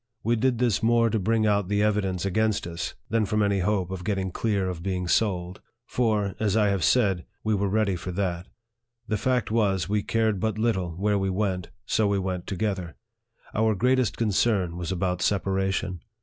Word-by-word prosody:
We 120 +1 +2
did 125 +1 +1
this 120 -4 +1
more 115 0 +3
to 110 - +1
bring 110 +3 +1
out 100 -3 +2
the 105 +1 +1
evidence 100 -4 0
against 110 +2 +1
us, 85 0 -5 0.2
than 115 -2 +2
from 105 0 +1
any 100 -1 +1
hope 95 -1 0
of 95 -1 -5
get 100 +2 0
ting 95 -1 -2
clear 100 -2 0
of 90 -2 -4
being 90 -1 -2
sold; 90 -3 0 0.2
for, 105 -6 0
as 110 -1 +1
I 105 -2 +3
have 100 -3 0
said, 100 -8 +3 0.2
we 110 - +1
were 100 -1 +1
ready 100 -2 +1
for 90 +1 -5
that. 90 -2 -2 0.6
The 110 - 0
fact 125 -1 0
was, 100 -6 +1
we 105 +1 +1
cared 110 -1 0
but 110 +1 -1
little 110 -6 0
where 100 +2 +1
we 95 0 0
went, 95 -2 -1 0.2
so 110 -2 +2
we 100 0 +1
went 95 -2 -3
together. 95 -4 -2 0.6
Our 110 0 +2
greatest 125 +1 +2
concern 100 -5 +1
was 85 0 -4
about 90 -1 -1
separation. 95 -2 0
100 Hz, 190 wpm, -26 LUFS, 95-110 Hz, 0.6 s, more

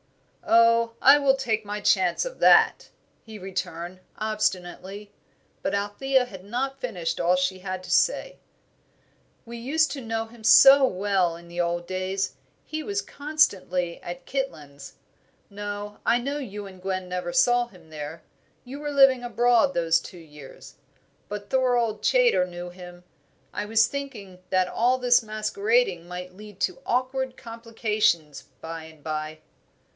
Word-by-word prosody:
"Oh, 230 0 +4
I 280 +2 +7
will 275 -1 +3
take 230 -5 -1
my 205 0 -5
chance 190 - +2
of - - -7
that," - - +5 0.3
he 220 -1 -10
returned, 180 -2 -5 0.2
obstinately. 200 -1 -3 0.5
But 200 - -1
Althea 250 +6 +1
had 190 -6 -11
not 265 +6 -3
finished 180 -10 -3
all 175 +1 +3
she 185 +1 -1
had 185 0 -5
to - - -8
say. - - +1 1.1
"We 235 0 -8
used 300 +7 +1
to 275 - -5
know 225 -1 -3
him 225 0 -16
so 270 +5 +8
well 190 -5 0
in 170 0 -13
the 175 +1 -3
old 175 0 -2
days; 185 +2 -2 0.3
he 310 0 -4
was 405 +5 -3
constantly 195 - 0
at 175 0 -8
Kitlands. 150 - -5 0.6
No, 205 0 -6
I 240 - +4
know 280 +4 -3
you 210 -6 -7
and 190 -2 -12
Gwen 185 -1 -3
never 180 -1 -4
saw 245 0 +3
him 180 -7 -19
there. 155 +1 -7 0.4
You 270 +3 -8
were 295 0 -4
living 270 -3 +5
abroad 240 +2 +2
those 165 -1 +3
two 180 - -11
years. 150 -4 -13 0.5
But 205 -1 -7
Thorold 245 -4 +1
Chaytor - - +3
knew 175 0 -7
him. 180 -1 -12 0.5
I 210 - -3
was 225 +1 +4
thinking 225 -10 -7
that 185 -1 +2
all 245 +6 +1
this 250 -1 +4
masquerading 235 - 0
might 180 +1 -7
lead 210 -1 -13
to 185 -1 -1
awkward 255 +1 -1
complications 215 - -1 0.2
by 165 0 -7
and 160 -2 -16
by." 155 0 -4
210 Hz, 150 wpm, -25 LUFS, 180-250 Hz, 1.1 s, so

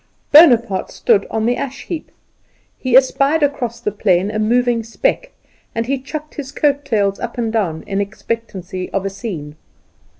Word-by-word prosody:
Bonaparte 240 - +6
stood 200 - +1
on 220 0 -1
the 245 +1 +2
ash 270 0 -5
heap. 325 -2 -5 0.7
He 255 -1 +4
espied 275 +3 +3
across 250 -5 -1
the 220 -3 -2
plain 195 -1 +1
a 215 - -2
moving 240 +2 +2
speck - - -1 0.5
and 230 0 -1
he 270 +2 -1
chucked 300 +3 -7
his 275 -2 -6
coat 285 -1 +1
tails 205 -7 0
up 235 0 -5
and 225 -2 -1
down 175 -8 -1
in 200 0 -1
expectancy 200 -3 -5
of 195 0 -1
a 195 - -2
scene. 165 -9 -6
230 Hz, 165 wpm, -18 LUFS, 200-275 Hz, 0.7 s, Bonaparte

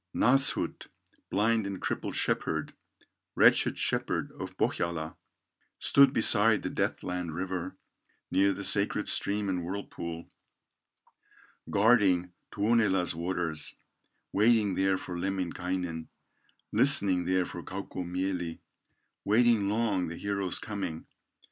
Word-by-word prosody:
Nasshut, 135 +4 +2 0.4
blind 110 +1 +1
and 100 -2 -5
crippled - - -3
shepherd, 80 -1 -1 0.6
Wretched - - +4
shepherd - - -1
of - - -8
Pohyola, 80 -2 -2 0.6
Stood 140 -1 +5
beside 110 -3 +4
the - - -3
death - - -2
land 90 -3 -4
river, 95 0 -4 0.5
Near 100 +1 +3
the 100 +1 -5
sacred 100 +1 +2
stream 105 0 0
and 90 -2 -2
whirlpool, 85 -3 -6 1.4
Guarding 100 -5 +3 0.2
Tuonela's 105 -4 +2
waters, 85 -1 -2 0.6
Waiting 105 -1 +3
there 95 0 +1
for 90 - -6
Lemminkainen, 90 -2 -3 0.6
Listening 90 -3 +3
there 90 0 +1
for 85 - -7
Kaukomieli, 90 -2 -4 0.7
Waiting 110 -1 +3
long 105 -5 0
the 85 +1 -7
hero's 100 -2 -1
coming. 100 -6 -5
95 Hz, 105 wpm, -29 LUFS, 90-105 Hz, 1.4 s, Stood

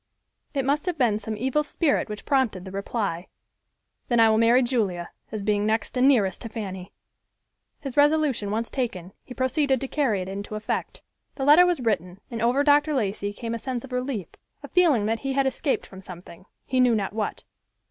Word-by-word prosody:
It 270 -2 0
must 290 +6 0
have 355 -2 -1
been 230 -6 +2
some 215 0 -5
evil 265 +6 0
spirit 295 -4 0
which 210 -1 -7
prompted 250 -10 +1
the 190 - -8
reply, 195 -3 -3 0.8
"Then 240 -2 +2
I 225 -1 +6
will 220 - +3
marry 235 +3 +5
Julia, 205 -9 -1 0.2
as 215 -2 -4
being 205 0 +1
next 220 +1 -1
and 255 +1 +4
nearest 205 -9 +2
to 230 - -6
Fanny." 195 -4 -6 0.9
His 270 -3 -6
resolution 290 -7 +2
once 225 +3 -2
taken, 195 -8 -3
he 250 - -11
proceeded 265 +1 +1
to 270 - -4
carry 245 -10 0
it - - -9
into 200 +2 -6
effect. 215 0 -4 0.3
The 270 - -3
letter 315 +5 +7
was 350 -6 0
written 190 -5 -1
and 230 -2 -4
over 245 +5 +3
Dr. 295 +1 +4
Lacey 205 -4 -1
came 230 +3 -5
a 230 - -3
sense 250 0 -4
of 270 - -11
relief—a 250 -6 -6
feeling 315 - +3
that 225 +1 0
he 270 -1 -3
had 275 0 +2
escaped 265 +1 -1
from 190 -1 -12
something, 180 0 -12 0.2
he 255 - 0
knew 250 -2 +4
not 200 -2 -2
what. 215 -1 -3
230 Hz, 195 wpm, -25 LUFS, 205-270 Hz, 0.9 s, letter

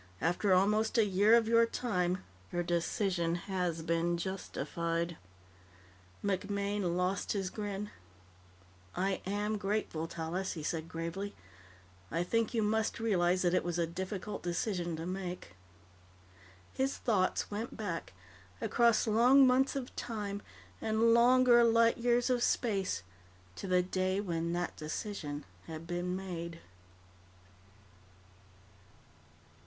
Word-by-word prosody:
After 175 - +1
almost 210 +5 +3
a 225 - +5
year 205 +3 +5
of 230 -2 +3
your 230 0 +5
time, 185 -7 -1 0.3
your 175 0 0
decision 170 0 0
has 175 -3 -2
been 170 +1 +1
justified." 170 -2 -3 1.1
MacMaine 200 -1 -1
lost 180 +1 0
his 195 -3 -2
grin. 205 -1 -4 1.0
"I 190 +1 0
am 205 +2 -1
grateful, 195 -5 -1
Tallis," 170 +4 -3
he 155 - -6
said 160 +1 -2
gravely. 170 +5 -4 0.7
"I 170 - 0
think 230 +4 0
you 225 - +2
must 220 +1 0
realize 185 -5 +2
that 175 -1 +2
it - - +2
was 175 -1 -2
a 170 - +2
difficult 190 +4 -5
decision 175 -1 -2
to 160 +1 -5
make." 180 - -5 1.2
His 265 +1 0
thoughts 200 -5 0
went 215 +3 -4
back, 180 - -4 0.5
across 235 -2 +3
long 245 +5 +6
months 260 +2 +3
of 260 -2 -5
time 205 -3 -4 0.4
and 225 +1 +3
longer 240 0 +6
light 230 0 +4
years 240 +1 +2
of 245 -1 +1
space, 195 - 0 0.5
to - - -6
the 180 -1 +3
day 185 +1 0
when 170 -4 -2
that 175 0 -2
decision 155 -2 -5 0.2
had 160 0 -7
been 175 +1 -2
made. 170 -3 -5
190 Hz, 120 wpm, -32 LUFS, 175-220 Hz, 1.2 s, long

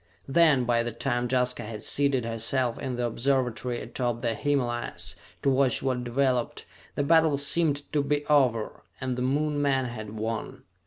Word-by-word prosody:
Then, 150 -3 +4
by 120 -1 +2
the 120 0 -3
time 120 +1 -1
Jaska 125 -1 +1
had 110 -1 -7
seated 140 -4 +1
herself 115 +2 -1
in 130 -2 -3
the 120 0 -1
observatory 125 0 0
atop 120 0 -3
the 115 -2 0
Himalayas, 120 -10 -2 0.3
to 140 - +3
watch 130 -2 +2
what 130 -2 -1
developed, 125 0 0 0.3
the 145 - 0
battle 160 -1 +4
seemed 145 0 +3
to 150 - +3
be 145 +1 -1
over, 125 -7 +2 0.2
and 130 -2 -2
the 125 - -4
Moon 145 +3 0
men 135 -2 +1
had 110 -3 -7
won. 110 +1 -4
125 Hz, 165 wpm, -27 LUFS, 120-140 Hz, 0.3 s, Then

